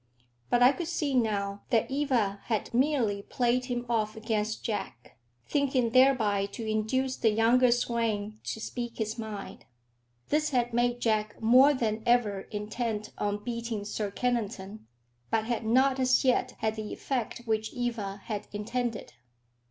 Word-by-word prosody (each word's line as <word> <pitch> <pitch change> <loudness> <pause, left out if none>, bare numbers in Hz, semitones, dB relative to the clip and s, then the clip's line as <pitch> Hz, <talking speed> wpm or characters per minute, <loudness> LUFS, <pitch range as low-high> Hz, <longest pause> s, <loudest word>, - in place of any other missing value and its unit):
But 245 0 +4
I 250 - +8
could 335 +3 -4
see 310 -5 -1
now 205 -5 0
that 230 +2 +1
Eva 250 -8 +1
had 220 -1 -2
merely 240 -6 +2
played 245 +3 0
him 245 -1 -3
off 220 -2 0
against 220 -1 -2
Jack, 195 - -5 0.3
thinking 265 -5 +1
thereby 230 -6 +4
to 230 - -5
induce 255 +5 0
the 225 - +2
younger 235 +3 +4
swain 225 -3 -1
to - - -3
speak 240 +1 -5
his 220 +1 -3
mind. 215 -3 -7 0.6
This 305 +1 +2
had 245 -3 0
made 240 0 +1
Jack 215 -2 0
more 255 +6 +6
than 220 -3 -1
ever 220 -5 +3
intent 215 +1 -3
on 205 0 -1
beating 230 -3 -4
Sir 210 0 -3
Kennington, 215 - -3 0.4
but 220 -1 +1
had 230 -1 -2
not 260 +3 +3
as 255 0 +3
yet 255 - +2
had 220 0 -1
the 215 -1 -5
effect 240 -3 -3
which 220 -1 -1
Eva 220 -5 -3
had 210 -3 -4
intended. 230 - -3
230 Hz, 150 wpm, -29 LUFS, 215-250 Hz, 0.6 s, I